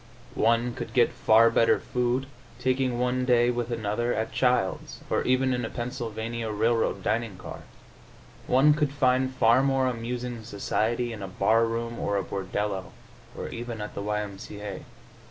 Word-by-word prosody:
One 115 +2 +2
could - - -7
get 120 -2 +4
far 115 +1 +5
better 115 0 +4
food, 125 +1 -1 0.3
taking 130 -1 0
one 125 +1 0
day 120 -1 +4
with 120 -1 -3
another, 115 +1 -1
at 110 +1 -2
Childs', 125 -7 0
or - - +2
even 130 +1 +2
in 125 0 -1
a 115 - -3
Pennsylvania 115 -2 -4
Railroad 110 +2 +1
dining 115 -4 -1
car; - - -9 0.9
one 135 +4 +5
could 150 -2 0
find 130 -2 +2
far 120 -1 +4
more 135 -1 +2
amusing 120 -1 -3
society 115 +3 -1
in 105 - -8
a 95 - -4
bar 110 +5 +2
room 115 +1 -3
or 100 - 0
a 100 - 0
bordello, 95 0 -3 0.4
or - - -5
even 120 -1 -6
at 105 0 -6
the - - -5
Y. 105 +1 -1
M. 100 -2 -7
C. 105 - -9
A. 105 -1 -6
115 Hz, 170 wpm, -27 LUFS, 110-125 Hz, 0.9 s, far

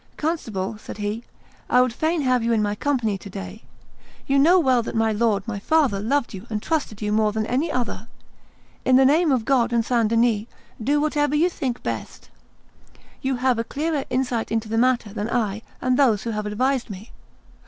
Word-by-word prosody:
"Constable," 225 - -3
said - - -9
he, 210 +3 -3 0.4
"I 250 - +5
would 250 -2 +3
fain 315 +4 0
have 255 -3 +2
you 235 0 +1
in 215 -2 +2
my 205 0 0
company 225 -5 -1
to 200 - -10
day; 95 - -8 0.6
you 275 0 +2
know 345 +6 +6
well 260 -6 +3
that 230 - -6
my 225 0 +2
lord 215 -2 0
my 210 -3 -3
father 280 -4 +2
loved 235 +5 0
you 195 +4 -9
and 215 -1 -2
trusted 225 -6 -2
you 210 - -1
more 215 0 +2
than 215 0 -2
any 275 +8 0
other; 240 -3 -3 0.8
in 260 - +4
the 265 +1 +6
name 310 +3 +4
of 250 -4 +1
God 245 -3 +2
and 230 -1 +1
St. 235 -3 +2
Denis 230 -1 +2 0.4
do 290 +5 +2
whatever 295 -1 +1
you 335 +4 +3
think 260 -7 -4
best. - - -6 0.9
You 265 -1 0
have 250 -1 +1
a - - 0
clearer 295 +3 -2
insight 250 -3 -1
into 225 0 -1
the 220 - -3
matter 240 -4 +1
than 215 +1 -3
I 220 -3 -1 0.2
and 255 0 +1
those 230 -8 +3
who 230 - -3
have 210 -1 -3
advised 255 +4 0
me. 205 +3 -9
235 Hz, 200 wpm, -23 LUFS, 215-270 Hz, 0.9 s, know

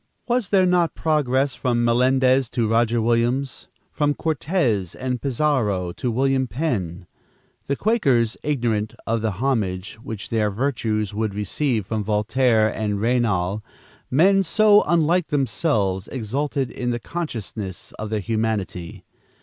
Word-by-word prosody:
"Was 240 -5 0
there 190 -2 +4
not 180 -2 +2
progress 140 -4 +1
from 120 -2 0
Melendez 130 +1 +3
to 120 -4 0
Roger 115 +1 +2
Williams? 120 +3 0 0.2
from 145 -1 0
Cortez 140 - -1
and 125 -1 -3
Pizarro 120 - 0
to 125 - -3
William 130 +2 +1
Penn? 100 - -3 0.6
The 140 - 0
Quakers, 135 - +2
ignorant 115 -7 -1
of 115 0 0
the 110 -2 -1
homage 105 -4 -2
which 110 -3 -7
their 110 -2 +1
virtues 110 -3 -1
would 105 -1 -2
receive 110 +1 -1
from 110 +1 -2
Voltaire 110 +2 +2
and 105 -2 -2
Raynal, 105 -4 +1 0.5
men 190 +9 +4
so 210 +3 +5
unlike 170 +1 +2
themselves, 110 - 0
exulted 135 +3 -2
in 125 -1 -3
the 120 0 -1
consciousness 110 - -5
of 110 0 -4
their 110 -1 -1
humanity. 110 -5 -3
120 Hz, 130 wpm, -22 LUFS, 105-140 Hz, 0.6 s, so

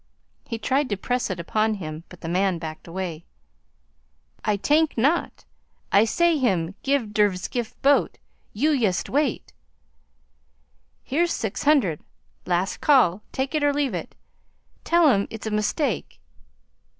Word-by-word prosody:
He 230 - -3
tried 265 +5 0
to 205 - -1
press 245 +5 -1
it 185 -3 -4
upon 215 +6 0
him, 160 -3 -7
but 180 - -14
the - - -6
man 185 +1 +1
backed 160 0 -8
away. 170 -2 -5 1.2
"Ay 210 -1 +1
tank 300 +8 +2
not. 290 +9 0 0.5
Ay 205 +3 +5
say 335 +6 +2
him 185 -8 0
get 270 -6 0
der 205 -2 +3
skiff 220 +5 -5
boat. 280 +1 +3 0.3
You 290 +9 +1
yust 220 - 0
wait 290 +3 -1 0.7
" - - -43
'Here's 335 +5 0
six 220 +3 -3
hundred. 260 - +3 0.5
Last 180 +2 0
call. 240 - +4
Take 265 +2 -2
it 305 -1 0
or 290 0 +3
leave 280 -5 0
it. 175 -3 -5 0.7
Tell 340 -1 +4
'm 200 -6 +2
it's 220 -1 -8
a 220 - -2
mistake.' 210 +8 -1
220 Hz, 145 wpm, -24 LUFS, 185-280 Hz, 1.2 s, Ay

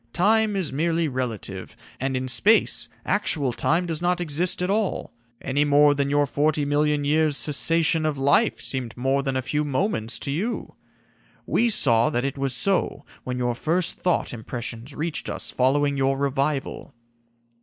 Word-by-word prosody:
Time 215 +2 +2
is 185 -8 -2
merely 165 +2 0
relative, 115 -8 -5 0.2
and 135 0 -1
in 130 0 -3
space 205 - +3 0.2
actual 145 -10 0
time 165 +8 0
does 165 -2 -3
not 175 0 0
exist 175 +2 0
at 180 - -1
all, 210 -2 -2 0.3
any 140 +2 0
more 145 0 +4
than 140 -1 -1
your 145 0 +2
forty 145 +1 0
million 145 0 +1
years' 150 0 +2
cessation 160 +2 +1
of 155 -2 -1
life 140 +12 +2
seemed 125 -4 -3
more 135 +2 0
than 135 -1 -3
a 130 - -1
few 150 +3 -1
moments 140 - -1
to 140 - -4
you. 205 +12 -3 0.7
We 235 +1 +1
saw 120 - +4
that 120 +2 -1
it 140 - -3
was 135 -2 +2
so 185 -2 +1 0.2
when 125 0 -3
your 120 -1 -1
first 165 +7 0
thought 180 -6 -1
impressions 120 +3 -6
reached 160 +1 -3
us - - -4
following 140 +2 +1
your 135 0 +1
revival." 140 -1 -2
145 Hz, 165 wpm, -24 LUFS, 130-165 Hz, 0.7 s, more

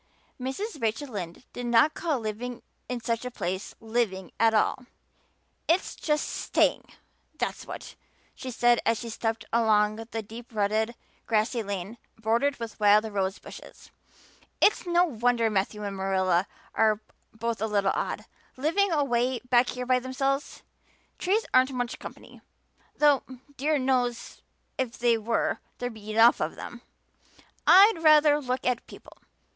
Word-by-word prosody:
Mrs. 290 - -4
Rachel 230 +6 -1
Lynde 185 -2 -6
did 245 0 -5
not 240 +6 +4
call 320 -5 -1
living 235 +3 -5 0.3
in 250 -1 -3
such 230 0 -2
a 250 - -3
place 190 -5 -4
living 220 -5 -2
at 225 0 +5
all. 235 +3 +1 0.8
"It's 340 +4 +1
just 300 -1 -1
staying, - - +1 0.5
that's - - -3
what," - - -8 0.4
she 260 - -7
said 240 -1 +3
as 230 0 +2
she 235 - -6
stepped 225 0 -3
along 215 -2 +3
the 225 0 -5
deep 225 +2 -11
rutted, 215 +3 0 0.3
grassy 225 +2 +1
lane 200 +2 -5 0.2
bordered 235 +6 +1
with 230 -1 -7
wild 210 0 +5
rose 195 -1 -1
bushes. - - -13 0.7
"It's 405 - +3
no 350 +1 +4
wonder 240 -5 +1
Matthew 210 +1 -1
and 200 -1 -4
Marilla 190 -1 +1 0.3
are 215 -1 +3 0.3
both 225 -1 -3
a 220 - +1
little 200 -2 +1
odd, - - -3 0.3
living 335 +8 +1
away 255 -4 +1
back 245 0 +5
here 250 0 -4
by 255 0 +3
themselves. 270 +2 -2 0.6
Trees 410 +5 +1
aren't 260 +1 +4
much 245 -1 -3
company, - - -11 0.6
though 290 -2 +5 0.3
dear 300 +3 +1
knows 250 -3 -1 0.4
if 250 -3 -2
they 240 -1 +3
were 225 +1 -1 0.2
there'd 245 -1 -4
be 215 -1 -11
enough 225 +2 +5
of - - -2
them. - - -9 0.9
I'd 395 +1 +8
ruther 300 -1 +6
look 255 -1 -3
at 250 -2 0
people. - - -14
235 Hz, 145 wpm, -27 LUFS, 215-260 Hz, 0.9 s, I'd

